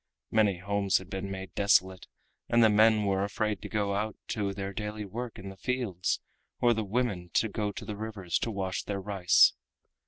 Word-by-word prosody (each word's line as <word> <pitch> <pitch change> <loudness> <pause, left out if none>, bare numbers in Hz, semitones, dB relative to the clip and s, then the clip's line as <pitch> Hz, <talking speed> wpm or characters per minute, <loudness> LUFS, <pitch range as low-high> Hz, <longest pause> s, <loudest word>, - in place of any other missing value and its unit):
Many 105 -4 +3
homes 100 +1 +1
had 95 0 -9
been 95 +1 -4
made 95 -1 -6
desolate 95 -2 +2 0.4
and 120 0 +5
the 110 - +6
men 110 0 +5
were 95 -1 +1
afraid 105 0 -1
to - - -7
go 105 -2 0
out 105 +2 -2
to 100 -2 -1
their 100 0 -5
daily 105 0 -4
work 115 +3 -6
in 95 0 -7
the 95 - -9
fields, 115 -6 -1 0.4
or 120 -1 +4
the 110 -1 -1
women 100 -5 -1
to 110 - +3
go 105 0 -2
to - - -8
the 105 - -5
rivers 100 -5 -3
to - - -2
wash 95 -3 -2
their 100 -1 -4
rice. 95 -2 +4
100 Hz, 195 wpm, -29 LUFS, 95-110 Hz, 0.4 s, the